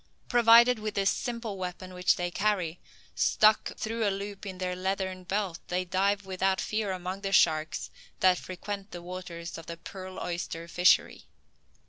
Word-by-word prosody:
Provided 235 0 +6
with 215 -1 -4
this 195 +1 +3
simple 230 -4 -4
weapon, 185 0 -6
which 180 0 +3
they 175 0 -2
carry, 185 -4 0 0.3
stuck 215 0 +3
through 225 +1 -2
a 205 - +3
loop 200 +1 -5
in 190 -1 -6
their 180 0 -2
leathern 190 0 -2
belt, 190 -2 -2
they 180 +1 -1
dive 195 +2 +1
without 190 0 0
fear 215 -2 -1
among 185 +1 -4
the 195 -1 -3
sharks 155 -4 +2 0.3
that 185 -1 +4
frequent 200 +2 -6
the 175 - -8
waters 175 -2 -7
of 165 - -12
the 170 - -6
pearl 185 +2 -8
oyster 170 -1 -4
fishery. 180 +1 +3
190 Hz, 160 wpm, -29 LUFS, 180-205 Hz, 0.3 s, Provided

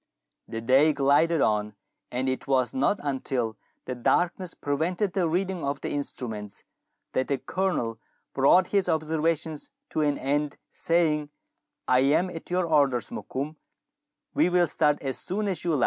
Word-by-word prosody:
The 115 - -5
day 135 +6 +4
glided 145 +3 +3
on, 105 -1 +1 0.4
and 125 +2 -1
it 130 0 -2
was 130 -3 +2
not 135 +10 +1
until 130 -5 -2 0.3
the 130 - -3
darkness 175 +8 0
prevented 175 +7 -1
the 180 -4 +1
reading 180 0 -1
of 140 +1 -2
the - - -3
instruments, 110 -7 -5 0.5
that 130 - 0
the 140 - 0
Colonel 135 -6 -2 0.3
brought 140 +7 +5
his 195 -3 +2
observations 160 -1 -1 0.2
to 155 - 0
an 145 -1 +1
end, 145 +2 -1
saying, 155 -3 +1 0.2
— - - -53
" - - -56
I 125 - +4
am 150 +7 +3
at 165 - -9
your 180 0 +1
orders, 140 -8 +2
Mokoum; 145 +4 -5 0.8
we - - +3
will 180 -1 +4
start 150 -2 +1
as 135 -1 -3
soon 205 +3 -2
as 185 -5 -2
you 170 -3 +1
like. - - 0
150 Hz, 165 wpm, -27 LUFS, 130-170 Hz, 0.8 s, brought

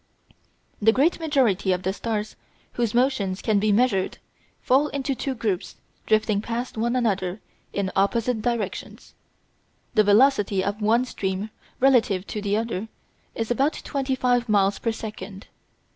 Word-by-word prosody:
The 220 +2 +6
great 290 +10 +2
majority 255 - +2
of 180 0 -1
the 190 - 0
stars 215 0 -3 0.4
whose 235 -2 -1
motions 235 -7 +1
can 215 -2 +1
be 210 +1 +2
measured 205 -3 +1 0.4
fall 270 +4 +3
into 280 -1 -2
two 265 +1 -3
groups 210 -6 -2 0.3
drifting 215 -1 +2
past 235 +3 -4
one 235 +2 0
another 195 -5 0 0.3
in 195 -1 -2
opposite 225 +4 +1
directions. 235 -2 -4 0.8
The 215 - +5
velocity 205 -2 +4
of 205 +2 -3
one 230 +4 +3
stream 195 -2 -3 0.3
relative 235 -8 +3
to 210 - -3
the 205 0 0
other 225 -2 -3 0.5
is 225 +1 -2
about 275 +6 +2
twenty 270 -2 -1
five 245 -2 +1
miles 200 -1 +2
per 230 - 0
second. 210 -3 -8
220 Hz, 145 wpm, -24 LUFS, 200-250 Hz, 0.8 s, The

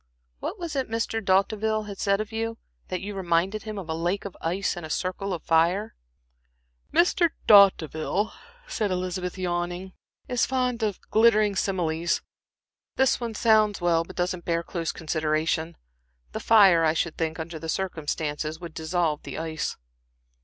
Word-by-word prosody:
What - - -4
was 335 -4 -5
it 265 -4 -1
Mr. 225 0 -2
D'Hauteville 210 +2 +1
said 200 +1 +1
of 215 +1 -4
you 225 0 -3 0.3
that 185 -1 -3
you 205 +1 -5
reminded 190 +2 0
him 215 0 -6
of 190 -4 -6
a 160 - -2
lake 175 +5 -1
of 200 - -6
ice 185 +5 -1
in 175 - -7
a 155 - -7
circle 185 +4 -2
of 175 -3 -4
fire?" 170 +6 +2 1.0
"Mr. 345 0 +4 0.2
D'Hauteville," 195 -1 +4 0.3
said 210 -2 -2
Elizabeth, 180 0 -3
yawning, 175 +1 -3 0.3
"is 245 -1 +1
fond 250 -2 0
of 210 -4 -1
glittering 215 -2 +4
similes. 170 -4 0 0.7
This 265 0 +3
one 235 -2 -4
sounds 215 -2 +3
well, 170 -2 +2
but - - -12
doesn't 180 0 -2
bear 170 0 0
close 170 -1 -3
consideration. 160 +1 -1 0.5
The - - -4
fire, 195 -7 +6
I 155 -1 +3
should 165 0 -1
think, 160 0 -2
under 160 0 -5
the 160 +1 -6
circumstances, 155 -3 -3
would 170 -3 -8
dissolve 160 -1 -1
the - - -7
ice." 160 -1 -3
185 Hz, 155 wpm, -26 LUFS, 165-215 Hz, 1.0 s, fire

